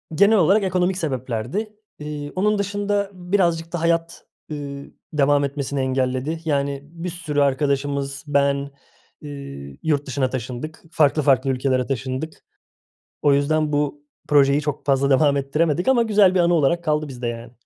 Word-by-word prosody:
genel 205 Hz, +5 st, +5 dB
olarak 195 Hz, +4 st, +4 dB
ekonomik 180 Hz, 0 st, +1 dB
sebeplerdi. 135 Hz, -, -3 dB, 0.3 s
İii, 150 Hz, -1 st, -6 dB
onun 210 Hz, +3 st, +2 dB
dışında 200 Hz, 0 st, -1 dB
birazcık 175 Hz, -3 st, 0 dB
da 175 Hz, -, -2 dB
hayat, 165 Hz, 0 st, 0 dB, 0.3 s
ııı, 140 Hz, -2 st, -6 dB, 0.3 s
devam 145 Hz, -1 st, +3 dB
etmesini 140 Hz, 0 st, -3 dB
engelledi. 130 Hz, +3 st, -1 dB
Yani 140 Hz, -2 st, 0 dB
bir 170 Hz, +4 st, -7 dB
sürü 155 Hz, -4 st, -2 dB
arkadaşımız, 140 Hz, 0 st, 0 dB
ben, 140 Hz, -1 st, +3 dB, 0.7 s
ııı, 140 Hz, -, -8 dB
yurt 145 Hz, -3 st, +1 dB
dışına 135 Hz, -1 st, 0 dB
taşındık. 130 Hz, +5 st, -6 dB
Farklı 155 Hz, -2 st, +3 dB
farklı 135 Hz, -1 st, +3 dB
ülkelere 130 Hz, -1 st, +1 dB
taşındık. 135 Hz, +4 st, -4 dB, 0.8 s
O 145 Hz, -, +4 dB
yüzden 150 Hz, +2 st, +1 dB
bu 145 Hz, 0 st, -1 dB, 0.3 s
projeyi 140 Hz, 0 st, +4 dB
çok 150 Hz, -1 st, -4 dB
fazla 140 Hz, -1 st, +2 dB
devam 140 Hz, +1 st, +4 dB
ettiremedik 150 Hz, -, 0 dB
ama 250 Hz, -3 st, +4 dB
güzel 205 Hz, -4 st, +4 dB
bir -, -, +3 dB
anı 175 Hz, 0 st, +3 dB
olarak 170 Hz, +2 st, +2 dB
kaldı 155 Hz, -1 st, 0 dB
bizde, 125 Hz, -3 st, -5 dB
yani. 115 Hz, 0 st, -6 dB
145 Hz, 145 wpm, -22 LUFS, 135-170 Hz, 0.8 s, genel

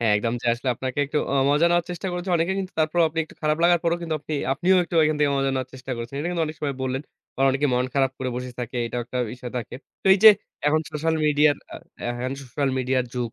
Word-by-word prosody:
হ্যাঁ, 110 Hz, -3 st, +3 dB
একদম। 115 Hz, +2 st, -1 dB
যে -, -, -4 dB
আসলে 120 Hz, +2 st, -4 dB
আপনাকে 130 Hz, +3 st, -4 dB
একটু 150 Hz, +2 st, -1 dB
আ -, -, +1 dB, 0.2 s
মজা 150 Hz, +4 st, +4 dB
নেওয়ার 175 Hz, -1 st, +2 dB
চেষ্টা 180 Hz, +2 st, -5 dB
করেছে 180 Hz, +1 st, -3 dB
অনেকে। 170 Hz, +3 st, +1 dB
কিন্তু 190 Hz, -1 st, -4 dB
তারপরও, 155 Hz, +2 st, +2 dB
আপনি 160 Hz, +1 st, -6 dB
একটু -, -, -17 dB
খারাপ 155 Hz, 0 st, +2 dB
লাগার 175 Hz, 0 st, +5 dB
পরও, 170 Hz, 0 st, +2 dB, 0.2 s
আপনি 150 Hz, +1 st, -5 dB, 0.2 s
আপনিও 175 Hz, +7 st, +3 dB
একটু 170 Hz, -, -8 dB
ওইখান 155 Hz, -1 st, +3 dB
থেকে 145 Hz, -, +3 dB
মজা 135 Hz, 0 st, +1 dB
নেওয়ার 130 Hz, -1 st, -2 dB
চেষ্টা 130 Hz, 0 st, -6 dB
করছেন। 115 Hz, +3 st, -6 dB
এটা 160 Hz, +4 st, -2 dB
কিন্তু 170 Hz, -2 st, -1 dB
অনেক 155 Hz, +1 st, -6 dB
সময় 140 Hz, -2 st, -2 dB
বললেন। 130 Hz, +1 st, -2 dB, 0.3 s
বা -, -, -7 dB
অনেকে 135 Hz, +2 st, +1 dB
মন 125 Hz, +1 st, +1 dB
খারাপ 135 Hz, -1 st, +2 dB
করে 130 Hz, -1 st, -2 dB
বসে 125 Hz, 0 st, -5 dB
থাকে। 125 Hz, 0 st, -5 dB
এটাও 120 Hz, +1 st, -3 dB
একটা 125 Hz, +2 st, -5 dB
বিষয় 125 Hz, 0 st, -8 dB
থাকে। 115 Hz, -, -7 dB, 0.3 s
তো -, -, -6 dB
এই -, -, 0 dB
যে 220 Hz, -, +13 dB, 0.4 s
এখন 155 Hz, +1 st, +3 dB
সোশ্যাল 160 Hz, +2 st, 0 dB
মিডিয়ার 150 Hz, -1 st, +4 dB, 0.2 s
আ -, -, -5 dB, 0.4 s
হ্যান 130 Hz, +2 st, -2 dB
সোশ্যাল 135 Hz, +2 st, -2 dB
মিডিয়ার 130 Hz, 0 st, +1 dB
যুগ 120 Hz, -2 st, -3 dB
140 Hz, 250 wpm, -24 LUFS, 125-160 Hz, 0.4 s, যে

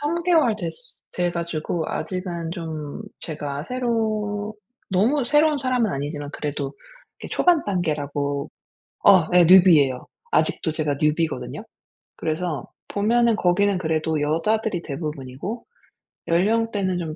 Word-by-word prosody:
3 295 Hz, +3 st, -1 dB
개월 315 Hz, -11 st, +4 dB
됐으 175 Hz, +5 st, -6 dB
돼 175 Hz, -1 st, 0 dB
가지고 170 Hz, -1 st, -3 dB
아직은 170 Hz, 0 st, -4 dB
좀 160 Hz, -1 st, -6 dB, 0.2 s
제가 145 Hz, -3 st, -5 dB
새로 215 Hz, -4 st, -1 dB, 0.4 s
너무 235 Hz, +9 st, +2 dB
새로운 295 Hz, +3 st, +3 dB
사람은 250 Hz, -6 st, +1 dB
아니지만 145 Hz, +1 st, -4 dB
그래도 145 Hz, -2 st, -3 dB, 0.5 s
이 -, -, -6 dB
초반 350 Hz, -3 st, +3 dB
단계라고 145 Hz, -6 st, -2 dB, 0.6 s
어 185 Hz, -5 st, +7 dB
예. 180 Hz, -1 st, +7 dB
뉴비예요. 165 Hz, -8 st, +6 dB, 0.3 s
아직도 155 Hz, 0 st, +1 dB
제가 150 Hz, -2 st, -1 dB
뉴비거든요. 150 Hz, -5 st, -1 dB, 0.5 s
그래서 155 Hz, -3 st, -2 dB, 0.2 s
보면은 230 Hz, +3 st, +2 dB
거기는 195 Hz, +1 st, +2 dB
그래도 160 Hz, -2 st, -1 dB
여자들이 175 Hz, +5 st, 0 dB
대부분이고 150 Hz, -, -5 dB, 0.6 s
연령대는 200 Hz, +1 st, +1 dB
좀 160 Hz, -3 st, -4 dB
175 Hz, 280 characters per minute, -23 LUFS, 155-215 Hz, 0.6 s, 어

